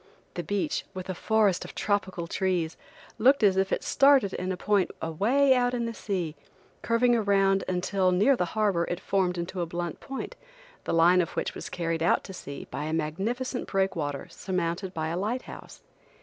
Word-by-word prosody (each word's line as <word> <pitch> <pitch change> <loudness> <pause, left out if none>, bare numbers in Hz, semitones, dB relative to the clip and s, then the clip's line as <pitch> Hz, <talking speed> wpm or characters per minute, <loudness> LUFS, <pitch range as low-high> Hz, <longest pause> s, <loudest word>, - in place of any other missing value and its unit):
The 175 - -3
beach, 200 +2 -1
with 185 0 -6
a - - -3
forest 210 -1 +2
of - - -10
tropical 190 -4 -1
trees, 175 -2 -1 0.4
looked 265 +2 +5
as 195 -2 +5
if 190 0 +1
it - - 0
started 275 -8 +4
in 185 +1 -3
a 185 - -3
point 200 -1 +2
away 235 - +3
out 245 -1 +1
in 235 -1 -1
the 230 - -3
sea, 180 -8 -3 0.5
curving 240 +1 +3
around 195 -3 +2
until 185 +1 +1
near 210 +10 +4
the 180 - 0
harbor 200 -6 +2
it 175 - -3
formed 185 -2 0
into 175 +2 -3
a 170 - -2
blunt 175 0 -4
point, 270 - -6 0.5
the - - -2
line 175 +2 +6
of 170 - -2
which - - -2
was - - -7
carried 165 -2 -2
out 170 - +3
to 190 - -9
sea 140 -6 -8
by 150 - -4
a 155 - -3
magnificent 210 - -2
breakwater 170 -8 -1
surmounted 180 0 -2
by 160 -3 -3
a 170 - -2
light 225 +6 -2
house. - - -11
190 Hz, 190 wpm, -27 LUFS, 170-215 Hz, 0.5 s, line